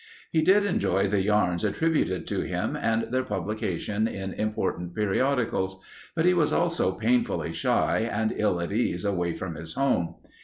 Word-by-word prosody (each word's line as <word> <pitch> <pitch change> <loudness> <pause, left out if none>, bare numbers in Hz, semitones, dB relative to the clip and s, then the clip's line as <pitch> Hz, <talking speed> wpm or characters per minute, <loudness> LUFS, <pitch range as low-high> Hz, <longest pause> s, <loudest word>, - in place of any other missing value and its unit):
He 160 - +3
did 195 +5 +4
enjoy 100 - +1
the 100 0 +1
yarns 95 -4 +1
attributed 160 - 0
to - - -2
him - - -2
and 115 +1 -1
their 130 - +3
publication 105 -2 -2
in 95 -3 -5
important 95 -5 -2
periodicals. 105 -3 0 0.4
But 165 0 +1
he 180 - +5
was 165 -4 +2
also 170 - +1
painfully 115 +5 0
shy 115 +1 +1
and 110 +1 0
ill 105 -5 +1
at 85 - -3
ease 100 -4 0
away 90 -4 0
from 90 -2 -5
his 80 +1 -7
home. 130 -11 +1
105 Hz, 160 wpm, -27 LUFS, 95-130 Hz, 0.4 s, he